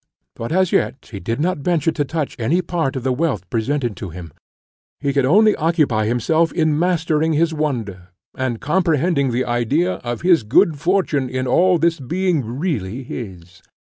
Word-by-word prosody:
But 115 - -5
as 185 0 +2
yet 135 - -1
he 100 - -6
did 115 +7 -3
not 175 +1 0
venture 165 +1 +1
to 150 - -1
touch 150 +1 -3
any 160 +11 +1
part 165 -6 -2
of 130 - -4
the 130 -1 +1
wealth 125 - -1
presented 120 0 -1
to 95 - -6
him; 85 -3 -10 0.7
he 140 -1 -1
could 140 -2 +2
only 210 +9 +5
occupy 150 -10 +1
himself 155 +8 +1
in 155 -2 +1
mastering 160 -2 +1
his 160 +2 +1
wonder, 115 - -3 0.3
and 130 -3 -2
comprehending 165 -3 +1
the 125 +1 -1
idea 130 +10 0
of 120 -1 -5
his 175 -5 +4
good 135 +7 +2
fortune 165 -6 0
in 130 0 -2
all 180 +8 +3
this 165 0 +1
being 170 +2 0
really 125 - -3
his. 90 -8 -9
145 Hz, 175 wpm, -20 LUFS, 120-165 Hz, 0.7 s, only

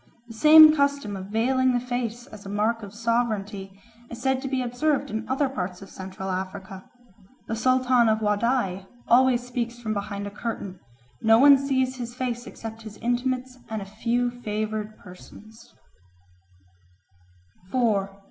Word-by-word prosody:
The - - -8
same 310 +5 +8
custom 280 -7 0
of 190 0 -7
veiling 255 +4 +1
the 245 - +2
face 245 -1 -4
as 215 -7 -13
a 195 - -8
mark 215 +3 0
of 200 -2 -9
sovereignty 210 -4 -2 0.3
is 235 - -8
said 265 +1 0
to 270 - -4
be 260 -1 -1
observed 250 +2 -1
in 220 +1 -4
other 270 +2 +1
parts 185 -7 -5
of 195 - -13
Central 190 0 -6
Africa. 190 +1 -6 0.6
The 225 - -2
Sultan 255 0 +3
of 220 - +3
Wadai 210 -3 0 0.2
always 250 0 +4
speaks 240 -1 -4
from 220 -2 -3
behind 200 0 -4
a 200 - -6
curtain; 200 -4 -5 0.4
no 225 -1 +5
one 280 +3 +8
sees 265 -1 0
his 240 -1 -6
face 245 -1 -3
except 225 0 -8
his 215 -2 -10
intimates 255 +1 -2
and 220 -1 -3
a 195 - -7
few 235 +4 -1
favoured 215 -2 -4
persons. 210 +4 -15
230 Hz, 150 wpm, -25 LUFS, 205-255 Hz, 0.6 s, same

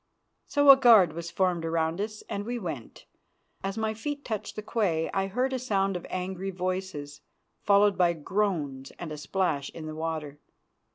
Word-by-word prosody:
So 285 -1 +7
a 270 - +8
guard 220 - +6
was 170 +1 -5
formed 180 -2 0
round 165 +2 0
us, 215 0 -5
and 200 - -3
we 240 +3 -3
went. 160 - -7 0.6
As 195 +2 -3
my 220 0 0
feet 285 +6 -5
touched 215 -2 -4
the 215 - -5
quay 180 -9 0
I 195 0 0
heard 250 +7 -1
a 260 - -1
sound 195 -6 0
of 180 - -5
angry 185 +1 -3
voices, 185 -6 -4 0.4
followed 200 -1 +4
by 175 -1 +4
groans 155 -6 -2
and 170 -3 -6
a - - -4
splash 150 -2 -1
in 160 - -9
the 155 - -5
water. 155 -2 -4
185 Hz, 175 wpm, -28 LUFS, 160-210 Hz, 0.6 s, a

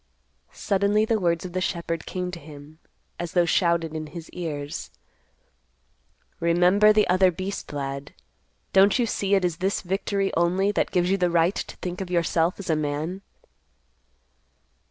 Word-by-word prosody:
Suddenly 200 +2 +1
the 220 -1 +1
words 170 -2 0
of 180 - -7
the 185 - -1
shepherd 170 -3 -3
came 180 -1 -3
to 175 - -7
him, 150 0 -13 0.4
as 175 -1 -4
though 175 -1 +4
shouted 170 -2 +1
in 155 -1 -5
his 165 +1 -9
ears, 150 -5 -5 1.5
_"Remember 180 +5 +4
the 210 0 +3
other 185 +1 +4
beast, 185 +3 -5
lad. 140 -1 -5 0.6
Don't 195 +3 +5
you 245 - +2
see 200 -2 0
it 190 -2 +2
is 170 -2 -1
this 190 +3 -1
victory 195 +1 -1
only 180 +4 +2
that 205 - 0
gives 180 0 +1
you 195 - +3
the 180 -1 +2
right 170 +2 +3
to - - -6
think 180 +1 -5
of 190 - -5
yourself 170 0 +1
as 200 - -8
a - - +3
man?" 155 +5 -3
180 Hz, 160 wpm, -25 LUFS, 165-195 Hz, 1.5 s, Don't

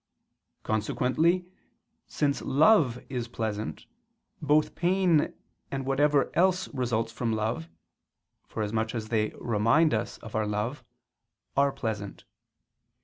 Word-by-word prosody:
Consequently, 130 - +1 0.6
since 140 -2 0
love 145 - +4
is 125 -3 -3
pleasant, 110 -8 -4 0.6
both 150 +1 +2
pain 175 -3 +2 0.4
and 135 -1 -3
whatever 140 0 +2
else 185 +1 +3
results 115 -4 -1
from 115 -1 -2
love, 110 -7 -2 0.8
forasmuch 110 +1 -2
as 110 -2 -4
they 110 -2 +1
remind 120 +8 +3
us 110 +1 -2
of 110 - -9
our 110 -1 0
love, 110 +6 -2 0.7
are 140 0 +3
pleasant. 110 -6 -5
120 Hz, 105 wpm, -28 LUFS, 110-150 Hz, 0.8 s, love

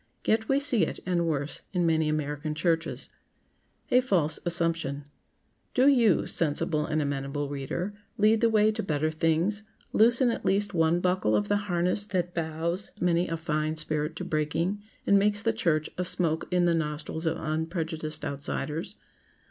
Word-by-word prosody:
Yet 220 0 +1
we 270 +1 +4
see 270 -9 +2
it—and 170 +1 -1
worse—in 160 +4 -2
many 160 -1 +2
American 150 0 -2
churches. 165 0 -1 0.8
[Sidenote: 250 +1 +4
A - - -15
FALSE 160 - +2
ASSUMPTION] 165 -5 0 0.7
Do 260 +2 +5
you, 235 - +4
sensible 155 0 0
and 155 0 0
amenable 140 +1 -2
reader, 145 +8 -3 0.2
lead 215 +2 +4
the 230 - +4
way 215 -1 +4
to 220 +1 -3
better 155 -4 0
things; 165 +6 +1 0.3
loosen 235 +3 +4
at - - -4
least 200 +1 +1
one 165 0 +2
buckle 180 -12 +2
of 105 -1 0
the 205 - +3
harness 180 +4 +1
that 180 -3 -1
bows 165 +3 -3
many 175 0 +2
a 165 - -2
fine 155 -1 -1
spirit 155 0 -2
to 180 - -5
breaking, 165 +5 -1 0.2
and 200 - +5
makes 205 +1 +1
the 225 - +2
church 155 -8 +1
a - - +2
smoke 165 -2 0
in 180 -1 +2
the 170 - +3
nostrils 160 +1 -2
of 160 - 0
unprejudiced 160 -1 -3
outsiders. 145 +2 -4
165 Hz, 160 wpm, -28 LUFS, 155-195 Hz, 0.8 s, Do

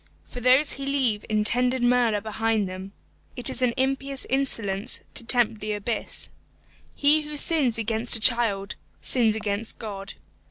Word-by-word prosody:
For 245 - -9
those 260 +4 +4
who 275 - -7
leave 265 -7 0
intended 245 +4 +2
murder 240 -4 +2
behind 220 -1 -1
them, 185 +1 -8 0.4
it 245 - -5
is 255 - -4
an 245 -2 +1
impious 270 +1 -1
insolence 230 -6 -1
to - - -3
tempt 230 -2 +1
the 210 0 -2
abyss. 210 +3 -3 0.7
He 300 +2 +3
who 300 0 -7
sins 285 -7 +1
against 225 +2 +2
a - - -1
child, 215 -4 +3 0.3
sins 230 -4 +1
against 215 0 -2
God. 195 -3 -7
235 Hz, 150 wpm, -25 LUFS, 210-260 Hz, 0.7 s, those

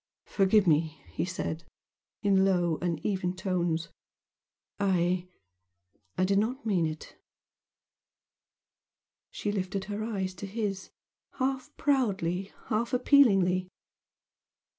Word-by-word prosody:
"Forgive 200 +1 +3
me!" 160 -2 +2
he 165 - -1
said, 170 -2 -4 0.6
in 195 -2 +4
low 175 -4 +2
uneven 180 +2 -1
tones 175 -3 -1 0.9
"I 180 -2 +1 0.9
I 185 - +2
did 195 +1 +3
not 245 +6 -2
mean 185 -7 +2
it!" 155 0 -8 2.1
She 205 - -3
lifted 195 -1 -2
her 210 +1 -4
eyes 195 -4 -2
to 195 - -6
his, 195 -2 -3 0.4
half 265 +1 -2
proudly 195 - 0 0.2
half 230 +3 0
appealingly. 195 -9 +4
190 Hz, 95 wpm, -29 LUFS, 175-210 Hz, 2.1 s, in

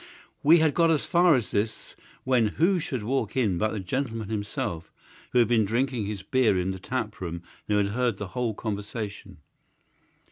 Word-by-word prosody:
We 160 +4 +7
had 160 -3 +3
got 165 -1 +3
as 155 -3 +2
far 175 -2 +5
as 120 -4 -2
this 110 +2 -2 0.3
when 125 -4 +3
who 180 +3 +3
should 130 -8 -4
walk 115 -1 -1
in 100 -9 +1
but 110 0 +1
the 105 - -3
gentleman 115 +1 -3
himself, 100 -6 -4 0.4
who - - +1
had 120 -2 +5
been 115 -1 +3
drinking 120 0 -1
his 100 -2 -5
beer 115 -2 +2
in 90 +1 0
the 95 - -6
tap 110 0 -4
room 85 -1 -5 0.3
and 105 - +3
had 100 0 +1
heard 120 -3 0
the 105 -2 -6
whole 120 -1 -2
conversation. 105 0 -5
110 Hz, 185 wpm, -26 LUFS, 100-130 Hz, 0.4 s, We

